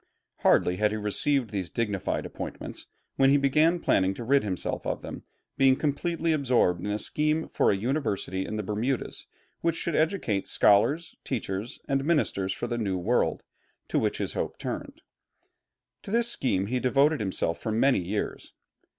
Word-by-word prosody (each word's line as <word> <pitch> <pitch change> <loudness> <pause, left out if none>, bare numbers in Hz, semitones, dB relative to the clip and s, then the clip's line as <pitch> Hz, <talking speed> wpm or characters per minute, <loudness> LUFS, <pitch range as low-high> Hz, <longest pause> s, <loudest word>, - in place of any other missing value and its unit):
Hardly 90 0 +3
had 105 +1 +3
he 110 - -3
received 115 +5 0
these 95 -4 -3
dignified 105 -5 -2
appointments - - -7 0.3
when 135 0 +5
he 140 - +5
began 150 +5 +3
planning 95 - +2
to 120 - -6
rid 140 +4 +3
himself 95 -4 -3
of - - -3
them, - - -8 0.3
being 135 -1 +6
completely 165 +4 -1
absorbed 125 - +2
in 105 - -2
a 105 - 0
scheme 155 +7 0
for - - +2
a 100 - +2
University 105 -5 -1
in 110 - -5
the 105 - -2
Bermudas, 110 +6 -2 0.3
which 165 -1 0
should 170 -2 -2
educate 155 - 0
scholars, 145 +11 +3
teachers, 110 -3 -4
and 135 0 +1
ministers 140 - +1
for 120 - -3
the 120 0 -2
New 100 -4 -1
World, 90 - 0 0.5
to - - +2
which - - 0
his - - -3
hope - - -3
turned. - - -6 1.0
To - - -10
this 235 +2 +2
scheme 95 - 0
he 125 +5 -1
devoted 140 +4 +3
himself 95 -4 -1
for 110 - -2
many 130 +5 +3
years. 95 +4 -4
120 Hz, 170 wpm, -27 LUFS, 100-145 Hz, 1.0 s, being